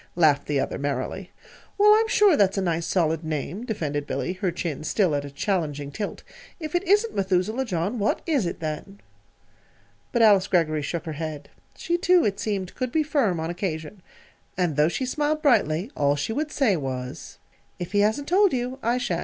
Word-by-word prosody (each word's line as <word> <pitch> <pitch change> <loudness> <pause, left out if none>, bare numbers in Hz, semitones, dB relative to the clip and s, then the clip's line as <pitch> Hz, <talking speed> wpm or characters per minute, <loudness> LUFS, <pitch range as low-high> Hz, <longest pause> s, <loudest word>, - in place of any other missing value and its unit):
laughed 155 -5 +3
the 145 -2 +1
other, - - -2
merrily. 145 +7 -3 0.5
"Well, 420 +1 +7
I'm 445 +1 +3
sure 420 -6 +5
that's 200 -5 +2
a - - +1
nice, 170 -2 -1
solid 165 -3 +1
name," 160 - -4
defended 145 -9 -3
Billy, 180 - -2
her 185 0 -1
chin 155 -4 -4
still 180 +1 +1
at 145 -1 0
a - - -7
challenging 145 -2 -2
tilt. 205 +6 -5 0.4
"If 310 -2 -6
it 350 - +2
isn't 420 +4 +3
'Methuselah 195 +6 0
John,' 195 +2 -2
what 205 - 0
is 280 - +1
it, 170 - -6
then?" 160 +6 -5 1.1
But 235 -2 +3
Alice 205 -4 +5
Greggory 155 -4 +1
shook 170 +4 -4
her 160 - -4
head. 150 -1 -6 0.3
She, 345 0 -1
too, 360 -2 +4
it 200 -1 -1
seemed, 195 -4 -3
could 255 -2 -3
be 315 +2 +2
firm, 260 - +1
on 160 +1 -2
occasion. 175 0 -4 0.6
And 175 -5 0
though 150 +2 +4
she 260 - -2
smiled 300 +4 -1
brightly, 210 - +2
all 145 0 +2
she 145 +10 -2
would 300 +4 -2
say, 255 -11 +2
was: 130 -1 -5 0.4
"If 175 -1 -6
he 205 - +2
hasn't 220 +8 +1
told 390 +2 +4
you, 250 +1 -2
I 235 +2 +1
sha'n't. 185 -9 -1
190 Hz, 195 wpm, -25 LUFS, 155-250 Hz, 1.1 s, Well